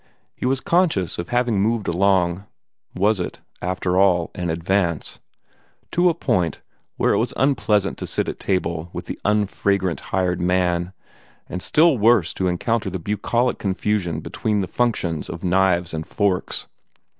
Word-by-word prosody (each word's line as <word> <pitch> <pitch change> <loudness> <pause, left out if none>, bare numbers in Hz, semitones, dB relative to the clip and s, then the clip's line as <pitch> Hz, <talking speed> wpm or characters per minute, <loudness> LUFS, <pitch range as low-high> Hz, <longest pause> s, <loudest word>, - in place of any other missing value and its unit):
He - - -2
was 130 0 +1
conscious 165 - +1
of 85 - -4
having 120 -4 +1
moved 110 +1 0
along 90 0 +2 0.5
was 100 +2 +2
it, 90 - -4 0.2
after 90 0 0
all, 90 -4 +3
an 90 -1 -3
advance? 85 0 -1 0.7
to 175 +1 +4
a 165 - 0
point 90 - 0 0.4
where - - +2
it - - +2
was - - -1
unpleasant 110 -7 +1
to - - -4
sit - - -1
at - - -5
table 85 -3 -1
with - - -5
the - - -6
unfragrant 100 -3 +1
hired 90 -2 0
man, 90 0 +1 0.5
and 90 - -5
still 155 - +4
worse 110 -5 +4
to 95 - -1
encounter 105 +4 0
the 95 - -3
bucolic 110 +7 0
confusion 95 -4 -1
between 105 +5 -1
the 95 - -2
functions 90 -11 -1
of 85 - -7
knives 90 -2 +2
and 80 0 -4
forks. 100 -3 -1
95 Hz, 155 wpm, -22 LUFS, 90-105 Hz, 0.7 s, to